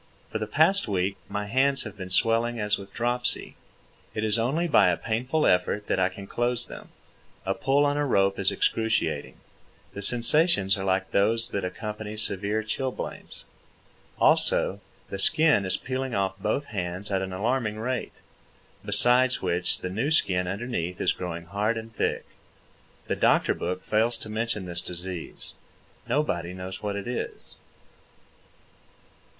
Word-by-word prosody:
For 110 - -2
the 110 - -3
past 160 - +4
week 100 -1 0
my 105 0 -3
hands 135 +6 +3
have 105 -4 -8
been 95 -2 -7
swelling 115 +4 +2
as 105 0 +1
with 100 0 -11
dropsy. 120 +2 0 0.6
It 110 - -1
is 110 +1 +3
only 145 +9 +1
by 145 - +5
a 90 - +1
painful 125 +8 0
effort 90 +3 +2
that - - 0
I 95 0 +3
can 100 +2 -9
close 120 +3 0
them. - - -10 0.6
A 95 - +1
pull 140 +7 +2
on 145 0 +1
a 145 - +1
rope 100 -5 +2
is 95 - +3
excruciating. 115 0 0 0.6
The 100 - -6
sensations 120 - +3
are 95 - -4
like 95 0 0
those 115 +4 +2
that 100 - -3
accompany 105 +3 -5
severe 105 +1 -1
chilblains. 130 +4 -4 0.7
Also, 100 +2 +3 0.3
the 100 - -4
skin 155 - +4
is 95 +1 +1
peeling 130 -1 -3
off 95 0 -1
both 140 +8 -1
hands 90 +1 -3
at 95 -1 +1
an 95 0 -4
alarming 110 +3 -1
rate, 125 +3 -3 0.7
besides 125 0 +3
which 90 -1 +1
the 90 - -3
new 115 +9 -1
skin 90 - +2
underneath 95 -3 -3
is - - +2
growing 85 -2 -5
hard 105 +5 -1
and 115 0 -8
thick. - - -1 0.8
The - - -1
doctor - - +3
book 90 +2 -4
fails 115 +3 +2
to 110 - -7
mention 110 -2 -2
this 85 -1 -4
disease. 90 -1 -6 0.6
Nobody 90 - 0
knows 95 +1 -6
what 105 -1 -2
it 100 - -4
is. 125 - -5
105 Hz, 155 wpm, -26 LUFS, 95-120 Hz, 0.8 s, by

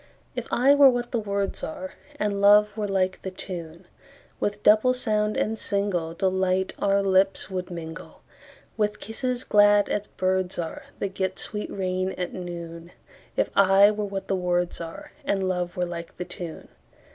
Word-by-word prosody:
If - - -4
I 265 +4 +4
were 285 -1 +8
what 245 -1 -2
the 235 - 0
words 200 -2 -2
are, 185 +4 -5 0.3
And 205 -1 0
love 210 +1 +6
were 210 -2 -2
like 190 -1 0
the 190 - -4
tune, 175 -2 -7 0.5
With 205 0 -2
double 220 +4 +5
sound 215 -3 0
and 225 +1 0
singleDelight 190 -1 0
our 200 0 +2
lips 195 0 +2
would 185 -1 -3
mingle, 165 -1 -8 0.5
With 210 -1 0
kisses 250 +3 -3
glad 205 -1 +5
as 205 0 -2
birds 185 0 -1
areThat 200 - -5
get 190 -1 -2
sweet 210 -1 -3
rain 185 -1 -2
at 180 -1 -4
noon; 170 -1 -7 0.4
If - - +1
I 200 +1 +6
were 210 0 -2
what 195 -1 -5
the 195 - +1
words 175 -1 0
areAnd 195 - -4
love 180 -1 -2
were 180 - +1
like 170 -1 -7
the 180 - -4
tune. 170 -3 -8
195 Hz, 155 wpm, -25 LUFS, 180-210 Hz, 0.5 s, were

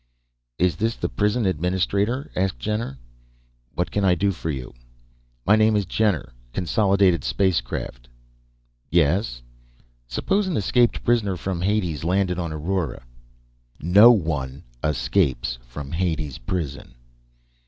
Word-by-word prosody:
"Is 90 -2 +1
this 115 +3 0
the - - -2
prison 105 +2 0
administrator?" 95 - 0
asked 95 0 0
Jenner. 105 - -3 0.8
"What 90 +2 -1
can 100 - 0
I 90 -2 +4
do 100 +3 +1
for 80 -3 -5
you?" 65 -4 -5 0.7
"My 105 - +6
name 110 0 +4
is 100 -2 +1
Jenner; 95 - 0 0.2
Consolidated 95 -1 +2
Spacecraft." 60 -8 -1 0.8
"Yes?" 80 - +1 0.6
"Suppose 195 - 0
an 180 - -1
escaped 120 +4 +2
prisoner 105 -6 +1
from 90 -1 -3
Hades 90 -6 0
landed 90 +1 +1
on 85 -2 -3
Aurora?" 80 -2 -2 0.8
"No 100 +8 +7
one 75 - -1 0.2
escapes 65 -3 0
from 70 +4 -9
Hades 80 -5 -2
Prison." 70 +1 -4
90 Hz, 120 wpm, -23 LUFS, 75-100 Hz, 0.8 s, No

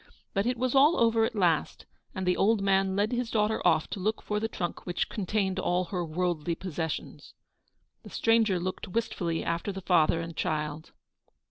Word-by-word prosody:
But 200 +3 0
it 245 0 0
was 255 +1 0
all 290 +5 +5
over 230 -1 +4
at 235 0 -4
last, 175 -6 +1 0.3
and 190 - -3
the 180 0 +2
old 210 0 +2
man 195 -1 +2
led 205 +2 +1
his 245 -1 -1
daughter 215 0 +1
off 155 - +3
to - - -4
look 215 +4 -1
for 210 0 -1
the 225 - -1
trunk 175 -6 -4
which 175 - -1
contained 195 -2 -1
all 180 -1 +1
her 180 -1 -3
worldly 170 0 -1
possessions. 165 -3 -5 0.7
The - - -12
stranger 225 -5 +2
looked 185 +3 -4
wistfully 180 -5 -2
after 170 +4 -2
the 195 0 -7
father 165 -3 +3
and 165 0 -6
child. 150 0 -3
190 Hz, 185 wpm, -28 LUFS, 170-220 Hz, 0.7 s, all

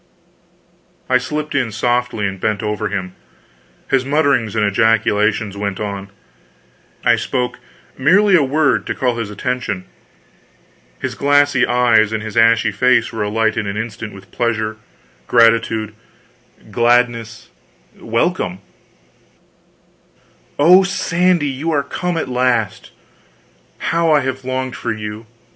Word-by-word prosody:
I 125 - +5
slipped 150 +4 -4
in 125 -5 0
softly 120 -1 -1
and 95 -1 -4
bent 110 +1 -1
over 105 0 -2
him. 95 -2 -4 0.7
His 135 -1 +1
mutterings 140 -6 +1
and 105 -1 +2
ejaculations 105 0 +1
went 100 -1 -4
on. 100 -1 -5 1.0
I - - +5
spoke 125 -1 -3 0.4
merely 190 +8 +4
a 170 - +5
word, 145 +2 +1
to - - -2
call 125 -2 -1
his 115 -3 -4
attention. 105 -3 -3 1.1
His - - -3
glassy 145 -2 +2
eyes 120 -3 +3
and 110 -1 -3
his 110 -1 -7
ashy 115 -1 +4
face 125 +5 +2
were 110 - -4
alight 110 +1 0
in 105 - -2
an 100 +1 -4
instant 110 -1 -5
with 100 0 -15
pleasure, 110 -2 -2 0.5
gratitude, 115 -2 +3 0.8
gladness, 120 -1 +1 0.5
welcome: 115 - -1 2.0
"Oh, 175 +6 +7
Sandy, 180 -4 +1
you 140 +4 -3
are 145 -3 +1
come 175 +5 -3
at 160 - -2
last 125 -4 -1 0.9
how 165 -1 0
I 150 -1 +4
have 130 0 -4
longed 130 0 -3
for 120 - -3
you! 110 0 -6
115 Hz, 125 wpm, -18 LUFS, 110-135 Hz, 2.0 s, Oh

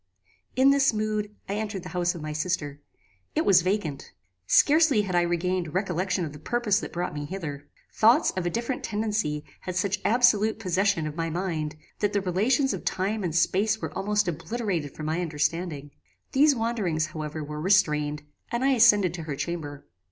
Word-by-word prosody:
"In 265 +2 +5
this 275 -3 +3
mood, 215 -1 -2
I 195 - -3
entered 210 -4 -4
the 180 - -7
house 175 -1 0
of 165 - -7
my 155 0 -4
sister. 145 -3 -2 0.5
It - - +1
was 185 -3 +6
vacant. 180 -6 -2 0.3
Scarcely 295 -7 +5
had 190 -2 -4
I 175 - +4
regained 175 -1 -1
recollection 185 -1 0
of 150 - -7
the 150 - -10
purpose 210 +4 +1
that - - -7
brought 175 +1 -3
me 145 -1 -4
hither. 145 -5 -6 0.3
Thoughts 235 +8 +4
of 185 - -3
a - - +2
different 235 +5 -3
tendency 210 -8 -2
had 180 - -6
such 195 +2 0
absolute 220 -2 +3
possession 195 -4 +1
of 150 -1 -5
my 165 0 -2
mind, 165 -3 -3 0.2
that 205 0 0
the 200 - +1
relations 225 +9 +1
of - - -5
time 200 +3 -1
and 165 -3 -2
space 205 +5 +2
were - - -5
almost 210 0 0
obliterated 175 - -3
from 155 - -6
my 160 +3 -1
understanding. 155 -2 -2 0.4
These 285 +1 +4
wanderings, 215 -9 0
however, 155 0 -5
were 150 +1 -6
restrained, 150 -5 +2 0.3
and 235 +2 0
I - - +4
ascended 210 -8 +5
to 170 -2 -6
her 140 - -2
chamber. 145 -2 -5
185 Hz, 180 wpm, -26 LUFS, 160-215 Hz, 0.5 s, was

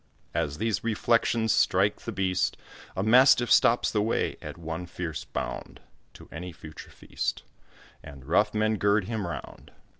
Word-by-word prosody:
As 70 0 -1
these 110 -1 -1
reflections 115 0 +1
strike 100 +3 +2
the 115 - -5
beast, 95 -3 0 0.4
A 95 - 0
mastiff 120 +2 +5
stops 120 - +4
the 105 - +1
way, 110 +2 0
at - - -8
one 80 +1 -6
fierce 80 -6 -5
bound, - - -5 0.4
To - - -13
any 90 +2 -7
future 80 -1 -11
feast, - - -4 0.6
And 70 -2 -12
rough 105 +7 +2
men 110 0 +1
gird 100 +1 +2
him 110 -3 -3
round. 85 - -8
100 Hz, 150 wpm, -27 LUFS, 85-110 Hz, 0.6 s, mastiff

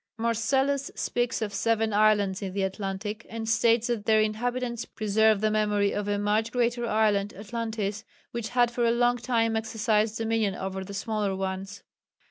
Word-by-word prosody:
Marcellus 265 +5 +1
speaks 240 -1 -1
of 205 -2 -4
seven 225 0 +1
islands 205 -2 +3
in 190 -2 -4
the 195 0 -1
Atlantic, 195 +3 -4
and 225 0 -5
states 230 0 +3
that 235 -4 -2
their 220 -1 +5
inhabitants 235 +2 -1
preserve 215 0 +2
the 215 0 +2
memory 210 -1 +1
of 205 0 -3
a 205 0 0
much 210 +2 0
greater 240 -1 0
island, 210 -2 +1
Atlantis, 220 0 -4 0.3
"which 235 -2 -4
had 245 -1 +2
for 240 0 -1
a 235 - +4
long 240 +1 +2
time 230 -2 0
exercised 220 0 0
dominion 225 -3 0
over 190 0 -4
the 200 +1 -8
smaller 210 -2 -1
ones." 190 +1 -5
220 Hz, 165 wpm, -27 LUFS, 205-230 Hz, 0.3 s, their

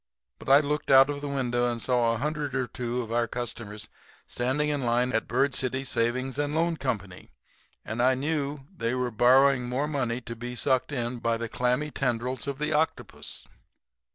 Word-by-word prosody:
But - - -8
I 140 +2 +8
looked 150 0 -2
out 135 0 +8 0.2
the 145 - -4
window 120 -3 0
and 120 - -4
saw 120 -1 +2
a - - -3
hundred 145 +1 -2
or 130 -1 +1
two 120 0 -3
of 115 - -9
our 120 0 +1
customers 110 -3 -5 0.4
standing 130 +5 -1
in 145 -2 -1
line 120 +1 +1
at 115 - 0
Bird 135 +3 +1
City 130 +1 -1
Savings 130 +3 0
and 145 +1 -1
Loan 165 +1 +1
Co., 130 -5 0 0.9
and 110 +2 -2
I 130 +1 +4
knew 145 0 -2
they 115 -5 -1
were 125 -1 -1
borrowing 125 +2 +4
more 135 +4 0
money 130 -5 -1
to 115 -1 -7
be 120 +2 -6
sucked 130 +3 +1
in 120 -2 -3
by 115 0 0
the 115 0 -3
clammy 125 +6 0
tendrils 125 0 -2
of 140 -1 -3
the 150 +1 -1
octopus. 155 +2 -2
125 Hz, 185 wpm, -27 LUFS, 120-140 Hz, 0.9 s, I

